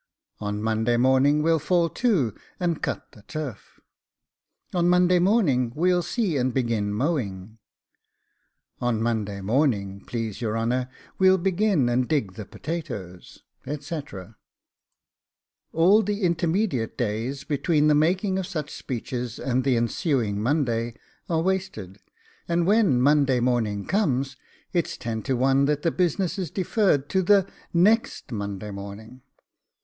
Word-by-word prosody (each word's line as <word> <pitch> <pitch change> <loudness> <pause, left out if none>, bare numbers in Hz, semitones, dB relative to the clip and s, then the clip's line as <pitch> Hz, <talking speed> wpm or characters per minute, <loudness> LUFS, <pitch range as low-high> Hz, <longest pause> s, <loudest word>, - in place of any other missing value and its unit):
On 105 0 -3
Monday 110 +2 +1
morning 130 +4 +3
we'll 165 0 +3
fall 170 +3 +2
to, 170 - +1 0.3
and 170 -3 -1
cut - - -4
the 110 - -16
turf. 140 -2 -7 0.9
On 175 -1 +2
Monday 180 0 +4
morning 175 - +2
we'll 180 +3 +2
see 175 - -1
and 130 0 +1
begin 115 -5 0
mowing. 110 - -2 1.2
On 120 -3 0
Monday 110 -4 -2
morning, 100 -4 0
please 115 -2 -4
your 110 -1 -1
honour, 125 +3 -1 0.3
we'll 190 0 +6
begin 190 - +1
and 120 +1 +1
dig 140 -12 0
the 105 +1 -8
potatoes,' 125 - -7 0.2
etc. 140 - -6 1.3
All 185 +7 +5
the 205 0 -2
intermediate 170 - 0
days, 120 +4 -2
between 150 +1 +1
the 150 - +5
making 185 +6 +2
of 185 - -4
such 155 -6 -4
speeches 125 -1 -5
and 130 0 -1
the 130 -2 +2
ensuing 115 - 0
Monday, 120 -3 0 0.3
are 165 -1 +1
wasted: 170 - -3 0.5
and 170 0 +1
when 200 - +3
Monday 140 -1 +3
morning 115 -5 0
comes, 135 -9 0 0.4
it 175 -3 +1
is - - -7
ten 115 -1 -4
to 130 +1 -1
one 135 +2 +3
that 150 0 0
the 165 - +2
business 180 +2 0
is 180 -4 -3
deferred 185 -5 +1
to 190 - +2
THE 195 +1 +4 0.2
NEXT 200 - +2
Monday 100 -1 -4
morning. 100 +5 -9
135 Hz, 135 wpm, -25 LUFS, 115-175 Hz, 1.3 s, we'll